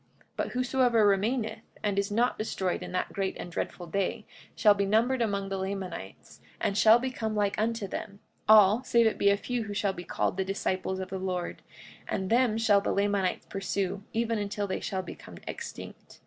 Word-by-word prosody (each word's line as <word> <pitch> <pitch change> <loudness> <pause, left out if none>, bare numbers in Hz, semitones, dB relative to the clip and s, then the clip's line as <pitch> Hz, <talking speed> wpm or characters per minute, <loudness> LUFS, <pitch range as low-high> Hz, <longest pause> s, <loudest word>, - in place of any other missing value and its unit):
45:14 - - -37 0.3
But - - -1
whosoever 250 -3 +3
remaineth, 215 +4 +1 0.2
and 205 -2 +1
is 200 - -1
not 235 +4 +2
destroyed 190 -4 -1
in - - -6
that 185 - -2
great 195 -1 -2
and 175 - -7
dreadful 175 +1 -4
day, 195 +3 -2 0.3
shall 210 -2 +6
be 200 0 0
numbered 235 +5 +2
among 200 -3 -1
the 195 0 -2
Lamanites, 190 - -6 0.2
and 200 - 0
shall 220 +2 +7
become 235 -3 -3
like 205 -1 +1
unto 225 -2 -1
them, 200 +1 -6 0.3
all, 215 +2 +7
save 235 -2 +3
it 220 - +1
be 200 - +5
a 200 - +3
few 240 +1 -3
who 205 -1 -6
shall 200 -2 +1
be 175 - -7
called 180 - -1
the 190 - +1
disciples 190 -1 -2
of 190 0 -5
the 190 - -4
Lord; 180 -2 -3 0.5
and 190 0 -2
them 235 -2 +3
shall 210 -3 +4
the - - -1
Lamanites 200 -2 0
pursue 195 -1 -2
even 230 -1 0
until 205 0 -2
they 190 - -2
shall 190 -1 -3
become - - -10
extinct. - - -8
200 Hz, 195 wpm, -29 LUFS, 195-225 Hz, 0.5 s, shall